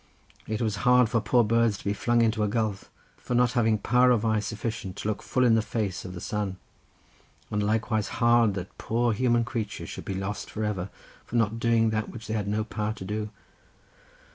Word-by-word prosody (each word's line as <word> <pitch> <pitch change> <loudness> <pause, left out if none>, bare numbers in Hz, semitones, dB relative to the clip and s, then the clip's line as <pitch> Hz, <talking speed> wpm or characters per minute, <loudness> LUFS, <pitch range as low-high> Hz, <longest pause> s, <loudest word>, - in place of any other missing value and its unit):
It 110 +2 -2
was 105 -2 -1
hard 125 +1 +4
for 115 -1 +1
poor 120 +2 +3
birds 115 -1 +2
to - - -13
be 100 - 0
flung 120 +3 +2
into 110 -1 +1
a 105 - +2
gulf 110 -2 -2 0.3
for 125 - -3
not 125 0 +4
having 115 -3 +2
power 125 +4 +3
of 115 -3 +3
eye 110 -1 +2
sufficient 110 -2 -4
to - - -5
look 110 - -2
full 130 - 0
in 115 - +5
the 110 - +4
face 105 -4 -3
of 90 -1 -7
the - - -6
sun, 105 -2 -3 0.9
and 105 - 0
likewise 110 0 0
hard 120 -3 +3
that 95 -1 -6
poor 120 +1 +1
human 120 +1 +2
creatures 115 -5 -4
should - - -7
be 95 - -3
lost 95 +2 -4
for 110 - -4
ever, 100 -3 -2 0.3
for - - -8
not 115 -1 +1
doing 115 -1 +3
that 110 -1 -1
which 115 -1 -9
they 110 - -4
had 105 -2 -1
no 105 +1 0
power 110 0 -3
to 95 - -9
do. 105 +2 -3
110 Hz, 215 wpm, -27 LUFS, 105-115 Hz, 0.9 s, in